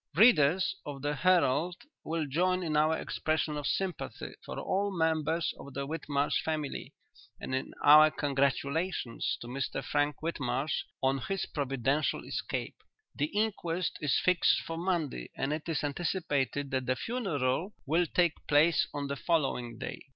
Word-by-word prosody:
"'Readers 185 - +5
of 140 -2 -7
The 145 0 0
Herald 175 0 +3 0.3
will 160 -1 -1
join 180 +6 +1
in 155 -3 -1
our 155 +1 +3
expression 155 -1 -1
of 145 -1 -3
sympathy 190 -2 -3
for - - -7
all 200 +2 0
members 160 -2 0
of 140 -1 -10
the 140 0 -2
Whitmarsh 145 -1 -1
family, 155 -3 -3 0.4
and - - -5
in 130 - -3
our 155 +1 +9
congratulations 140 0 -1
to 120 - -7
Mr 130 +2 -3
Frank 145 0 +1
Whitmarsh 140 -3 -1 0.2
on 135 +1 +2
his 195 +7 -2
providential 135 +1 -1
escape. - - -4 0.4
"'The 145 - 0
inquest 185 -4 -1
is 145 -3 +2
fixed 185 -1 +4
for 165 - -5
Monday 165 - -2
and 135 +2 0
it 155 +2 -4
is 160 - -1
anticipated 145 -3 -1
that 130 -2 -1
the 130 - +2
funeral 180 - -1
will 165 +4 +2
take 175 -2 +2
place 150 +2 +4
on 145 -1 -2
the 140 0 -3
following 135 -8 0
day.'" 130 - -6
150 Hz, 150 wpm, -30 LUFS, 140-170 Hz, 0.4 s, our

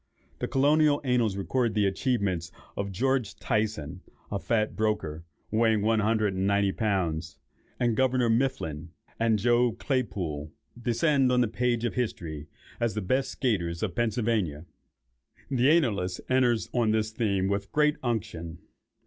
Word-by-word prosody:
The - - -2
colonial 145 +2 +3
annals 120 -6 +1
record 115 +3 0
the 105 -1 +3
achievements 95 - 0 0.2
of 100 0 -3
George 125 +2 0
Tyson, 105 -9 -2 0.3
a 100 - -1
fat 110 +4 0
broker, 105 -8 -1 0.3
weighing 110 -1 +2
one 110 +1 +3
hundred 105 -1 +1
and 95 +1 0
ninety 100 -1 +2
pounds; 85 - -1 0.4
and 120 -2 +2
"Governor 130 -1 +2
Mifflin, 115 - -1 0.3
and 115 -1 +3
Joe 120 +2 +3
Claypoole," 95 - -2 0.3
descend 130 +3 +2
on 125 0 +3
the 120 - +3
page 120 +1 0
of 120 - -1
history 80 -11 -3 0.3
as 115 -2 0
the 105 - -1
best 130 +8 0
skaiters 85 -9 0
of 100 -5 -1
Pennsylvania. 110 -8 0 0.9
The 130 +1 +3
annalist 105 - +2
enters 125 -3 +2
on 120 -3 +2
this 110 0 +1
theme 100 -4 0
with 100 0 -2
great 150 +1 +3
unction. 105 -9 -3
110 Hz, 140 wpm, -28 LUFS, 95-125 Hz, 0.9 s, colonial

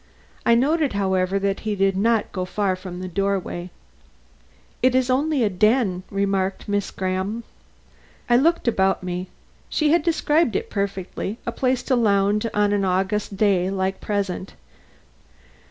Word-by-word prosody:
I 235 - +6
noted, 290 +3 +2
however, 190 -1 +1
that 195 0 -1
he 215 -1 -2
did 195 -1 +2
not 225 +3 +1
go 185 - -3
far 190 +1 -1
from 185 -1 -8
the 185 - -4
doorway. 185 -1 -2 1.1
"It 255 0 +3
is 260 0 +2
only 280 0 +1
a 215 - +2
den," 210 -1 +2
remarked 195 -1 -1
Miss 205 -1 -1
Graham. 190 +4 -3 0.8
I 240 - +4
looked 320 +3 +2
about 195 -5 +2
me. 180 0 -4 0.4
She 305 -1 +1
had 340 0 +4
described 310 - +1
it - - -2
perfectly: 200 +1 -3
a 235 - -1
place 255 +1 0
to 260 - +1
lounge 205 -2 +2
in 230 - -2
on 205 0 +2
an 200 -1 +1
August 190 +2 -1
day 190 -3 +2
like 190 0 -1
the - - -14
present. 200 -2 -2
200 Hz, 155 wpm, -23 LUFS, 190-235 Hz, 1.1 s, I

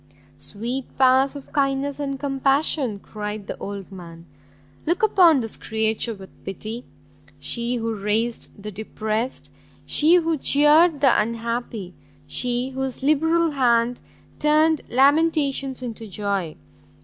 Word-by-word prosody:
"Sweet 240 +5 -5
powers 265 +1 +4
of 280 - -11
kindness 275 0 0
and 275 -2 -3
compassion!" 270 -3 +1
cried 210 0 -6
the - - -5
old 200 -1 -7
man, 170 -3 -11 0.6
"look 345 +6 0
upon 350 -9 +5
this 225 -2 -3
creature 220 +1 -1
with 190 -1 -15
pity! 220 +5 -6 0.5
she 235 - -2
who 230 -1 -2
raised 220 +3 -1
the 210 +1 -6
depressed, 220 +3 -4 0.3
she 315 +4 +4
who 330 -3 +1
cheared 295 +3 +4
the 270 -6 +5
unhappy! 230 -3 -4 0.3
she 245 - -1
whose 265 0 -4
liberal 320 +3 +2
hand 245 -3 +2 0.4
turned 310 +1 +3
lamentations 275 -1 +2
into 230 -2 -6
joy! 200 -5 -3
250 Hz, 120 wpm, -23 LUFS, 215-285 Hz, 0.6 s, upon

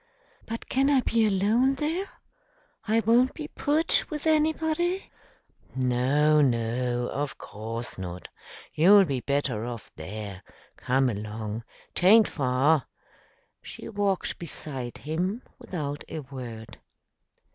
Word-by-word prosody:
"But 230 +1 -5
can 270 +2 +2
I 275 -3 +4
be 230 -2 +2
alone 215 +7 +3
there? 325 +8 -2 0.8
I 225 +1 +3
won't 235 +4 +3
be 305 -2 -6
put 310 +3 +1
with 300 -1 -5
anybody?" 320 +4 +1 0.6
"No, 130 +4 +3
no; 120 -1 0
of 145 0 -3
course 115 +1 -6
not! 90 -1 -6 0.5
You'll 195 +5 +7
be 135 -5 -1
better 140 -4 -1
off 120 -2 -6
there. 100 +3 -7 0.3
Come 130 +1 +1
along. 110 0 -4 0.3
'Taint 210 +5 +6
far." 135 +1 +2 0.7
She - - -9
walked 200 -3 -1
beside 135 -7 -5
him 180 - -2 0.2
without 150 - -4
a 160 - -4
word. 125 -5 -9
150 Hz, 115 wpm, -27 LUFS, -, 0.8 s, You'll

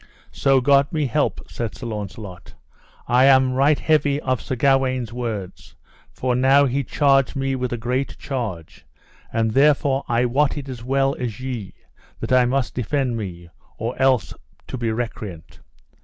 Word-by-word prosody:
So 135 -1 +2
God 140 +1 +4
me 155 -3 0
help, 125 - 0
said 115 -3 -5
Sir - - -8
Launcelot, 105 -4 -7 0.5
I 125 +2 +4
am 130 -1 +5
right 140 +3 +3
heavy 145 -2 +2
of 130 -4 -1
Sir 130 - -4
Gawaine's 130 -3 +1
words, 110 -7 -6 0.4
for 125 -1 -1
now 135 +3 +5
he 135 +1 0
charged 135 +1 +2
me 135 0 -1
with 125 -1 -3
a 120 - -2
great 125 +4 -2
charge; 115 - -5 0.5
and 110 -1 0
therefore 140 +1 +3
I 120 +1 +2
wot 140 +5 +1
it 140 -1 -6
as 125 -3 -7
well 135 +2 +1
as 120 -3 -4
ye, 120 -8 -5 0.4
that - - -5
I 130 -1 +5
must 130 +1 0
defend 125 +1 -1
me, 90 -6 -6 0.3
or 115 +3 -3
else 130 -5 +2 0.4
to - - -4
be 120 -3 -1
recreant. 110 -7 -6
130 Hz, 160 wpm, -22 LUFS, 115-135 Hz, 0.5 s, am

